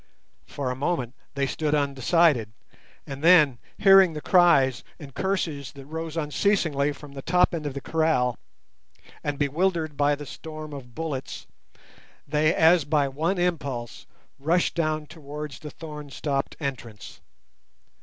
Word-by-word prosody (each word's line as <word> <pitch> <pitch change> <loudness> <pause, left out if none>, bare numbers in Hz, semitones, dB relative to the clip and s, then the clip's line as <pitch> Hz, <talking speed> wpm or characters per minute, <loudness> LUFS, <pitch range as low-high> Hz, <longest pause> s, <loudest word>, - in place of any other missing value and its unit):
For 135 -3 -3
a - - -3
moment 130 -3 -2 0.2
they 140 0 +1
stood 150 +2 -1
undecided, 140 - +2 0.5
and 140 +1 -8
then 155 -8 +6 0.2
hearing 195 -3 +6
the 150 - -5
cries 145 - +4
and 140 -4 -11
curses 160 -8 -2
that 140 -1 -11
rose 160 +2 -6
unceasingly 150 -2 +1
from 145 0 -11
the 140 -1 -8
top 180 +5 +2
end 155 -3 -3
of 140 - -5
the 140 - -4
kraal, 155 -8 +1 0.8
and 145 -1 -2
bewildered 155 +2 0
by 145 0 +3
the 145 +1 -9
storm 155 +1 -8
of 125 -4 -10
bullets, 150 -5 -5 0.8
they 150 +2 +2
as 165 0 +5
by 145 -1 +1
one 160 +8 -1
impulse 140 -10 -3 0.3
rushed 165 +5 +1
down 155 -2 -1
towards 150 -2 -8
the 150 - -8
thorn 150 -2 -9
stopped 140 0 -2
entrance. 125 -7 -6
150 Hz, 140 wpm, -25 LUFS, 140-165 Hz, 0.8 s, then